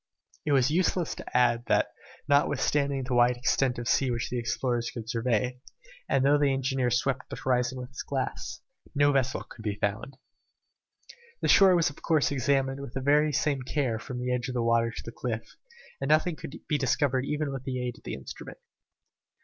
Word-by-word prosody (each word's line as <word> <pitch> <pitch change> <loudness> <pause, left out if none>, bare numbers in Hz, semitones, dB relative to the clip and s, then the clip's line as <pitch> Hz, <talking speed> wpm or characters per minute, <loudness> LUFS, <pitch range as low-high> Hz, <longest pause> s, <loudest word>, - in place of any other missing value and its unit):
It 145 - +3
is 135 0 +3
useless 175 0 +1
to - - -4
add 120 -1 +3
that - - +2 0.4
notwithstanding 140 -1 +2
the 130 0 -3
wide 120 0 +4
extent 125 +1 +1
of 120 0 -5
sea 135 +1 +2
which 120 -1 -2
the 125 - -1
explorers 120 +1 -1
could 115 -2 -7
survey, 120 +1 -1 0.5
and 135 - +2
though 145 +1 +5
the 145 -1 +3
engineer 135 -1 0
swept 125 +2 -1
the - - -5
horizon 125 0 0
with 125 0 -7
his 125 - -7
glass, 135 -2 -4 0.3
no 145 0 +4
vessel 130 -2 0
could 115 - -13
be 105 -2 -2
found. 105 +6 -3 1.3
The - - +2
shore 190 -2 +7
was 165 -4 +2
of - - -16
course 155 -4 +2
examined 135 0 +1
with 140 -3 -8
the 145 +3 +3
same 145 -1 +1
care 130 -3 -1
from 125 +2 -7
the 125 0 -1
edge 125 0 -1
of 130 - -5
the 120 - +1
water 115 0 +3
to 115 - -8
the 115 - -6
cliff, 115 -2 -5 0.5
and 135 - -2
nothing 155 +2 +3
could 145 - -8
be 150 - +1
discovered 135 -1 +1
even 150 -2 -2
with 135 -2 -5
the 130 -1 -2
aid 125 -1 -4
of - - -28
the - - -4
instrument. 65 - -9
130 Hz, 195 wpm, -28 LUFS, 120-140 Hz, 1.3 s, shore